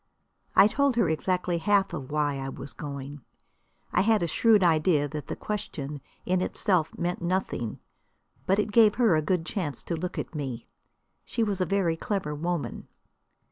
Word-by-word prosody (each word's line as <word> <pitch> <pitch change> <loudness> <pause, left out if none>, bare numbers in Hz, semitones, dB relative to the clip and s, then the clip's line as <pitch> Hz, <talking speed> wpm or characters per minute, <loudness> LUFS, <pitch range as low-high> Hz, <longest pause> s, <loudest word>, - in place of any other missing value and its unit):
I 195 - +8
told 280 +4 +2
her 230 -7 +3
exactly 175 +2 0
half 200 +1 +2
of 140 -6 -5
why 145 -2 0
I 135 0 -4
was 140 - -7
going. 140 -1 -7 0.7
I 180 - +4
had 215 -1 +3
a - - +1
shrewd 215 +4 +4
idea 155 -3 +3
that 150 -1 -6
the - - -4
question 150 -9 -5 0.2
in 185 0 +1
itself 185 -4 0
meant 175 +1 -2
nothing. 175 - -2 0.7
But 195 - +3
it 210 0 0
gave 215 -1 +6
her 230 -9 +4
a 155 - +2
good 165 +1 0
chance 175 -8 -3
to 170 - -2
look 175 +2 -4
at - - -4
me. 135 -6 -4 0.6
She 230 - -1
was 200 -3 -1
a 180 - +1
very 175 -3 +1
clever 185 -5 -2
woman. 170 +2 -3
175 Hz, 175 wpm, -27 LUFS, 150-200 Hz, 0.7 s, I